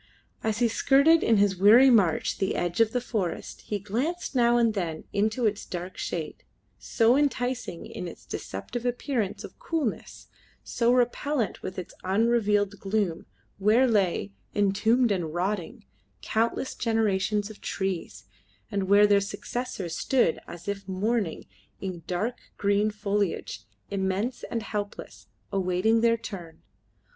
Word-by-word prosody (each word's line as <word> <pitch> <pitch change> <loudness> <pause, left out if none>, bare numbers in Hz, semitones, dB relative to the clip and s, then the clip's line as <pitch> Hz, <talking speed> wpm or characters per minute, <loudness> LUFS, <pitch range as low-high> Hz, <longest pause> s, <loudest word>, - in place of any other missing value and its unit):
As 220 -1 0
he 240 0 +3
skirted 280 +7 +4
in 225 - +3
his 200 -2 +3
weary 230 +8 +7
march 190 -9 +2
the 195 - 0
edge 175 +4 0
of 225 -1 +4
the 250 - 0
forest 205 -8 -4
he 210 - -1
glanced 245 - -3
now 240 -2 +4
and 230 -2 +3
then 170 -6 -3
into 220 +4 +1
its 210 -1 0
dark 180 +1 -6
shade, 160 -3 -5 0.4
so 230 +1 +3
enticing 255 - -1
in 180 - -6
its 170 - -11
deceptive 230 - -5
appearance 245 -4 -2
of - - -11
coolness, 310 -9 -3 0.4
so 235 0 +1
repellent 250 0 0
with 185 - -6
its 185 - -6
unrelieved 205 0 +2
gloom, 195 -4 -1 0.3
where 220 +6 +4
lay, 190 - +1 0.2
entombed 215 +4 +3
and 170 -5 -2
rotting, 180 - -2 0.4
countless 230 +4 0
generations 210 -2 0
of 215 - -15
trees, 190 -3 -3 0.5
and 195 -2 -1
where 205 +1 +7
their 205 -1 +4
successors 200 -3 -4
stood 250 -11 +2
as 170 +1 -10
if 200 -1 -4
mourning, 200 -1 -1 0.3
in 185 -3 -5
dark 210 +7 -2 0.2
green 205 +1 +2
foliage, 205 -2 -2 0.3
immense 195 +5 -1
and 230 -2 -2
helpless, 205 -2 -6 0.2
awaiting 195 +4 +2
their 230 0 +4
turn. 175 -8 -9
210 Hz, 135 wpm, -27 LUFS, 190-235 Hz, 0.5 s, weary